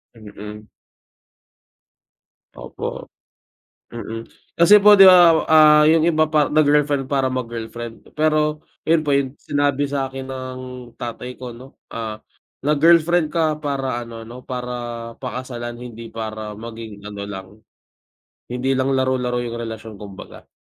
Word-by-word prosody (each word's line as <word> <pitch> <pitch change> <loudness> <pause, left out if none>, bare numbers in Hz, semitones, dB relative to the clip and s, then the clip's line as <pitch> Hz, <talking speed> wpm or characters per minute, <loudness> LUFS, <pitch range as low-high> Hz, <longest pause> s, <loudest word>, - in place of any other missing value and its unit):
Mm. 105 0 -10 1.9
Opo, - - -6 0.9
mm, 115 -1 -6 0.3
kasi 205 +5 +7
po 210 +1 +8
'di 195 - +8
ba 175 -3 +8 0.2
ah, 150 -1 +7
'yung 160 +1 +4
iba 155 -1 +2
pa 150 -2 +3
nag-girlfriend 145 -2 +2
para 135 -2 +2
mag-girlfriend, 115 -2 -6
pero 155 0 +1 0.2
iyun 165 -1 +4
po 145 - -3
iyung 140 0 +1
sinabi 145 -1 0
sa'kin 135 -1 -3
ng 130 -1 -6 0.4
tatay 120 +1 -6
ko 125 -1 -8
'no, 130 +3 -13 0.2
ah, 110 -2 -6 0.4
nag-girlfriend 165 +2 +4
ka 155 -2 +1
para 135 -4 -2
ano, 115 -1 -9
'no 120 +3 -12
para, 125 -1 -4 0.5
pakasalan 125 -2 -6
hindi 115 -1 -9
para 110 -2 -6
maging 110 -2 -9
ano 105 -1 -7
lang. 95 -2 -7 1.0
Hindi 125 +2 -2
lang 135 +1 +1
laro-laro 125 -2 0
'yung 120 0 -5
relasyon 110 -2 -7
kumbaga. 100 -2 -11
130 Hz, 125 wpm, -21 LUFS, 115-150 Hz, 1.9 s, po